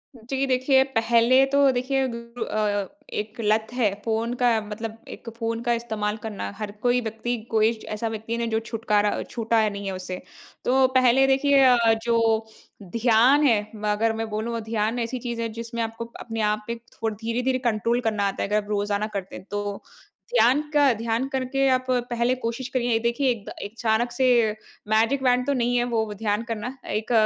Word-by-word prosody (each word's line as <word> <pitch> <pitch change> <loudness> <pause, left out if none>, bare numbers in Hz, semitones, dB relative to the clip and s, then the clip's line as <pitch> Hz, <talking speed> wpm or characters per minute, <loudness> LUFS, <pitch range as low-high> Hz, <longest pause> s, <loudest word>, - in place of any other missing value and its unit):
जी। 265 +4 -2
देखिए 265 +1 +4
पहले 235 +3 +4
तो 280 -1 +5
देखिए, 260 +2 0
बिल्कुल 235 0 -6
अ, 205 -2 -1 0.3
एक 210 +1 -3
लत 215 +1 +2
है 220 -6 +1
फ़ोन 225 +2 0
का 245 - +5
मतलब 220 +2 -6
एक 230 - -8
फ़ोन 230 0 -2
का 240 0 +2
इस्तेमाल 220 -2 -2
करना 215 -3 -4
हर 210 -2 -4
कोई 245 0 +2
व्यक्ति 230 +2 -3
कोई 220 0 +4 0.2
ऐसा 225 +2 -2
व्यक्ति 225 +1 -4
है 230 - -1
जो 220 0 0
छुटकारा 215 -3 0
छूटा 225 -2 +1
नहीं 200 0 -6
है 195 - -2
उसे। 185 0 -6 0.4
तो 260 +1 +4
पहले 255 +1 +5
देखिए 275 +1 +4
अ, 250 -2 +6 0.3
जो 225 -1 +2 0.5
ध्यान 245 +5 +5
है 225 -4 +4 0.2
म 215 0 -6
अगर 225 +2 +1
मैं 225 0 -4
बोलूँ 225 +2 -3
ध्यान 220 +2 -1
ऐसी 240 +2 -3
चीज़ 235 -1 -4
है 230 - -2
जिसमें 235 0 -4
आपको, 225 +1 -5
अपने 225 -1 -4
आप 215 0 -3
पे 235 - -2 0.2
थोड़ 225 -1 -2
धीरे-धीरे 240 +4 -1
कंट्रोल 235 0 0
करना 215 -3 0
आता 195 - -2
है - - -3
अगर 210 - +2
आप 205 - -14
रोज़ाना 205 0 0
करते 195 -2 -5
हैं। 185 - -10
तो 205 -1 -3 0.5
ध्यान 270 - +5
का 290 -1 +4
ध्यान 230 +3 -1
करके 270 0 0
आप 255 0 +2 0.2
पहले 240 +1 +1
कोशिश 235 +3 -3
करिए 245 -1 0
ये 225 - +3
देखिए 235 +4 +1
एक 220 -4 -5
द - - -7
अचानक 225 +3 0
से 260 +2 +1 0.6
मैजिक 225 +5 +2
वॉन्ड 250 0 +3
तो 285 - +2
नहीं 245 -2 +1
है 240 - +2
वो 220 -2 0
ध्यान 210 +1 -1
करना। 230 +2 -5
एक 215 +3 -2
230 Hz, 190 wpm, -24 LUFS, 215-245 Hz, 0.6 s, अ